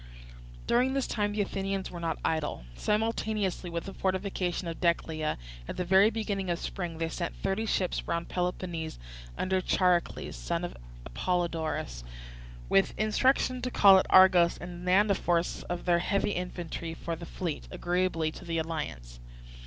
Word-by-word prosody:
During 250 +3 +3
this 275 - +1
time 205 -2 -1
the 210 - 0
Athenians 195 -1 -2
were 175 - -6
not 165 -2 -2
idle. 155 - -1
Simultaneously 210 - -1
with 170 0 -3
the 195 - -7
fortification 190 -2 -1
of 165 - -5
Decelea, 160 -3 0 0.3
at - - -5
the 180 - -1
very 190 +4 +6
beginning 205 -4 -2
of 170 - +1
spring, 170 -2 -4
they 165 0 -1
sent 170 +1 -4
thirty 215 +4 -1
ships 185 -3 0
round 170 0 -1
Peloponnese, 175 -3 -3 0.4
under 185 0 +1
Charicles, 180 -1 +1
son - - -2
of - - -7 0.3
Apollodorus, 160 - -2 0.6
with 95 +9 +3
instructions 255 +4 +2
to 250 - -1
call 195 -5 +7
at - - -1
Argos 185 -2 +6
and 175 0 -8
demand 190 +3 +4
a - - +6
force 175 -2 0
of 175 0 -3
their 175 -1 +4
heavy 200 +3 +1
infantry 175 -3 -4
for 165 +1 -4
the 170 +1 -9
fleet, 170 -5 -4
agreeably 175 -3 0
to - - -11
the 165 -1 -2
alliance. 145 - -4
180 Hz, 160 wpm, -29 LUFS, 165-195 Hz, 0.6 s, call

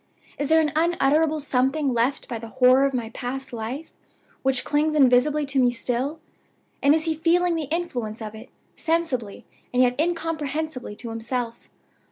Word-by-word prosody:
Is 290 0 -1
there 320 0 +6
an 300 -2 0
unutterable 315 -1 +2
Something 270 0 +1
left 240 +4 0
by 235 -3 -4
the 230 - -8
horror 255 +3 +4
of 275 - 0
my 230 -2 -3
past 260 +2 -5
life, 240 +7 -5 0.5
which 265 -1 +1
clings 305 +1 +1
invisibly 285 +2 +4
to 275 -1 0
me 250 -1 +5
still? 250 +5 -2 0.6
And 285 +2 +5
is 320 0 0
he 325 - +1
feeling 340 +2 +2
the 315 -4 -3
influence 245 -11 -3
of 215 -2 -6
it, 220 +4 -11 0.3
sensibly, 315 - -2 0.3
and 250 0 +4
yet 250 0 +3
incomprehensibly 315 -6 -2
to 235 - -7
himself? 230 +1 -4
270 Hz, 165 wpm, -24 LUFS, 245-315 Hz, 0.6 s, there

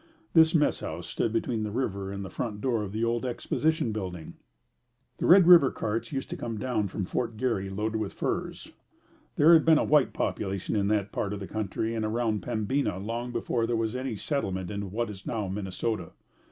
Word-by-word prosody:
This 160 0 +6
mess 150 -2 +3
house 80 +2 -5
stood 115 - -1
between 115 0 -1
the 105 - -2
river 100 -4 -2
and 100 0 -5
the 95 - -8
front 115 -4 -4
door 120 -2 0
of 100 -2 -5
the 110 +2 -2
old 115 +1 0
Exposition 130 +2 0
Building. 90 -6 -5 0.9
The - - 0
Red 185 +1 +8
River 170 -6 +8
carts 115 +7 -3
used 135 -2 -3
to - - -2
come 115 -2 -4
down 115 -3 -1
from 95 0 -3
Fort 115 +2 -2
Garry 110 -6 -1
loaded 110 +3 -2
with 105 -3 -3
furs. - - -3 0.6
There 160 +4 +7
had 160 -2 +7
been 160 -1 +6
a - - +2
white 150 -3 +4
population 95 0 -2
in 100 -1 +1
that 100 -1 0
part 100 - -2
of 100 - -4
the 100 - -5
country 110 +2 -3
and 110 -1 -2
around 110 -1 0
Pembina 115 +1 -1
long 115 +5 -4
before 115 -1 -1
there 120 - 0
was 115 +1 -1
any 130 -2 -3
settlement 95 - -2
in 100 -1 -4
what 110 +2 -2
is 100 -1 -11
now 110 -4 -2
Minnesota. 95 0 -3
110 Hz, 205 wpm, -28 LUFS, 100-125 Hz, 0.9 s, Red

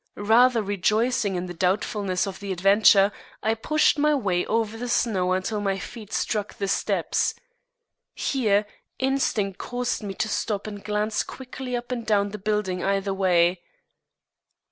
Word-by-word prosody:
Rather 230 +2 +4
rejoicing 205 +1 +1
in 180 0 -2
the 175 - -6
doubtfulness 185 +1 0
of 195 -1 -6
the 200 -1 -5
adventure, 195 +2 +5 0.3
I 220 - +2
pushed 305 +6 +2
my 300 0 +3
way 190 -9 0
over 225 -1 0
the 245 +2 -5
snow 190 -7 +1
until 205 +3 -1
my 195 -1 0
feet 215 +2 -9
struck 210 -3 -2
the 200 - -3
steps. 195 - 0 0.8
Here, 215 -6 +1 0.3
instinct 245 -8 0
caused 245 0 -2
me 200 -2 -5
to 220 - -1
stop 210 -1 -2
and 205 -2 -7
glance 210 0 0
quickly 255 -1 -6
up 245 +1 -5
and 240 -2 -2
down 205 -2 +1
the 210 - -6
building 195 -3 -1
either 195 0 0
way. 180 -2 +2
210 Hz, 150 wpm, -25 LUFS, 195-230 Hz, 0.8 s, adventure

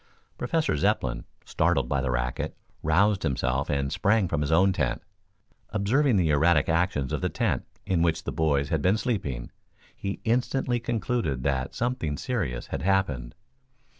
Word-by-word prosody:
Professor 155 - 0
Zepplin, - - 0 0.2
startled - - +1
by 70 -1 0
the 65 - -1
racket, 60 0 -2 0.2
roused 95 +5 +3
himself 65 -2 0
and 70 -1 0
sprang 105 -1 +2
from 75 - -1
his 75 +1 -1
own 95 +4 +4
tent. 60 -8 -1 0.7
Observing 110 +6 +2
the 85 -5 +3
erratic 75 +1 +4
actions 80 -5 0
of - - -1
the - - 0
tent - - -1 0.2
in 90 -3 +1
which 85 -1 +1
the - - -3
boys 70 -3 +1
had 80 - 0
been 95 +6 +3
sleeping, 75 - -3 0.4
he 100 0 -4
instantly 120 +1 +1
concluded 115 - -1
that 65 -1 -1
something 115 - -1
serious 95 - -2
had - - -4
happened. 80 -11 0
85 Hz, 155 wpm, -27 LUFS, 70-105 Hz, 0.7 s, own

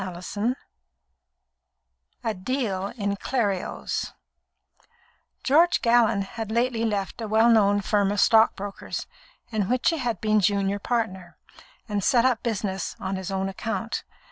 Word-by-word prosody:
CHAPTER 185 +3 -6
III 250 - +1 1.7
A 225 -2 0
Deal 195 -2 -2
in 200 -2 -1
Clerios 205 -6 -2 1.3
George 325 +6 +4
Gallon 230 -4 +4
had 220 +2 -6
lately 235 0 +1
left 205 0 -2
a 225 - -3
well 220 +2 +4
known 205 -2 +4
firm 200 0 +1
of 205 - -1
stockbrokers, 205 -3 +2 0.5
in 210 -4 -1
which 250 +6 +2
he 330 - -2
had 240 -3 -2
been 215 -1 +2
junior 200 0 +1
partner, 190 -6 -3 0.5
and 205 -3 -2
set 245 0 +4
up 250 -4 +2
business 200 -5 -2
on 190 +1 -3
his 190 0 -5
own 190 0 -1
account. 225 +4 -3
210 Hz, 135 wpm, -25 LUFS, 195-235 Hz, 1.7 s, George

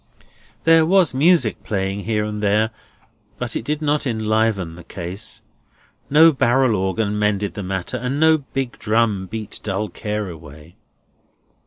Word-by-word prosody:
There 165 0 +6
was 180 -2 +3
music 135 - +3
playing 95 0 -2
here 105 -1 0
and 105 0 -4
there, 105 +2 +2 0.7
but 120 -2 -4
it - - -2
did 150 +4 -3
not 150 -1 +1
enliven 110 -6 0
the 85 +1 -12
case. 90 +5 -6 0.7
No 160 +3 +7
barrel 130 -2 +2
organ 100 +2 -1
mended 105 -1 0
the 105 - -5
matter, 95 -1 -3
and 130 +3 -3
no 160 0 +5
big 135 -2 -5
drum 110 -3 +1
beat 110 +1 -7
dull 105 +1 -2
care 105 +2 -4
away. 80 -1 -12
110 Hz, 145 wpm, -21 LUFS, 100-130 Hz, 0.7 s, No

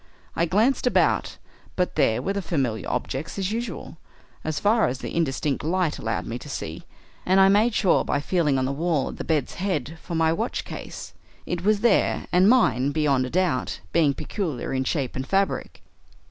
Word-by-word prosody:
I 170 - +1
glanced 225 +9 +2
about, - - +2 0.4
but 180 -1 0
there 110 - +2
were 195 - -1
the 200 - -2
familiar 135 - -2
objects 135 +7 -3
as 195 0 -1
usual, 220 -8 -5 0.5
as 155 -1 -2
far 220 +2 +3
as 130 - -2
the - - -6
indistinct 145 -3 0
light 170 0 0
allowed 115 0 -2
me 120 +2 -5
to 145 - -10
see, 80 - -6 0.4
and 190 +1 +3
I 195 0 +7
made 215 +3 +3
sure 190 - +3
by 145 - 0
feeling 150 -3 +1
on 130 - +1
the 130 - -1
wall 155 0 0
at - - -8
the - - -4
bed's 155 -5 0
head 160 -5 -2
for 170 - -5
my 160 0 +3
watchcase. 225 +7 -5 0.3
It 175 - -3
was 210 0 +2
there, 235 -3 +2
and 185 +3 +5
mine 140 - +3
beyond 140 -4 +1
a - - -7
doubt, 175 -5 0
being 150 -5 +3
peculiar 160 - -3
in 130 0 0
shape 135 -3 -1
and 130 +1 -4
fabric. 195 0 -1
165 Hz, 190 wpm, -24 LUFS, 135-195 Hz, 0.5 s, I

